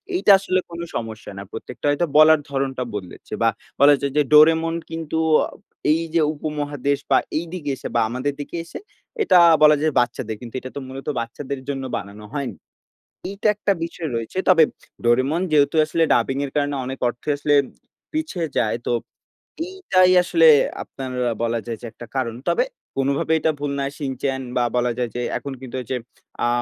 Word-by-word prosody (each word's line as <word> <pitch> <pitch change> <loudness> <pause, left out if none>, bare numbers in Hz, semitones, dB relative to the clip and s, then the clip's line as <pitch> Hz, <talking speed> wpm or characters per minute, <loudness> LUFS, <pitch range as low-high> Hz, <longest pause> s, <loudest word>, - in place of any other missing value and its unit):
এইটা 360 - +4
আসলে 185 -1 0
কোন 170 0 -8 0.2
সমস্যা 110 -1 -5
না। 100 - -6
প্রত্যেকটা 120 +3 -8
হয়তো 145 +4 +2
বলার 155 0 +7
ধরণটা 135 -2 -2
বদলেছে 95 -4 -8
বা 115 - +5 0.3
বলা 145 +2 +7
যায় 140 -1 -1
যে, - - +6
'ডোরেমন' 160 +2 +5
কিন্তু 165 -1 -4 0.3
আ - - -5 0.4
এই 160 +2 +2
যে, 165 - +5
উপমহাদেশ 145 -2 -2
বা - - +7 0.2
এইদিকে 165 -2 -4
এসে 125 - -7
বা 120 - +4
আমাদের 130 +4 -2
দিকে 145 - -7
এসে - - -8 0.4
এটা 180 - +5 0.3
বলা 150 0 +8
যায় 155 -1 +1
বাচ্চাদের 115 -2 -1
কিন্তু 120 -1 -9
এটা 130 - -8
তো - - -3
মূলত 135 +1 -9
বাচ্চাদের 130 +4 -5
জন্য 135 -1 -3
বানানো 100 +2 -9
হয়নি। 140 -3 -3 0.7
এইটা 200 +2 -2
একটা 205 0 0
বিষয় 165 -1 -4
রয়েছে। 115 +10 -5
তবে 165 -3 +7 0.4
'ডোরেমন' 130 +9 +2
যেহেতু 145 0 +3
আসলে 165 +2 +1
ডাবিংয়ের 135 +4 0
কারণে 145 -1 0
অনেক 130 0 -5
অর্থ 120 - -9
আসলে 145 0 +2 0.6
পিছে 310 - -3 0.2
যায়। 110 0 +1
তো - - 0 0.8
এইটাই 195 - +3
আসলে 165 -2 +4 0.4
আপনার 130 -1 -7 0.3
বলা 115 0 0
যায় 115 -1 -4
যে, 120 - -8
একটা 120 - -11
কারণ। 115 -3 -1
তবে - - +2 0.3
কোনভাবেই 140 +4 +1
এটা 160 - +3
ভুল 145 0 -2
না 140 - 0
'শিনচান' 135 -1 -3
বা 125 - +3
বলা 120 0 +1
যায় 125 -1 -1
যে, 120 - -2 0.2
এখন 140 - -6
কিন্তু 130 -1 -8
হচ্ছে 125 +1 -3 0.5
আ - - +3
140 Hz, 175 wpm, -22 LUFS, 125-160 Hz, 0.8 s, বলা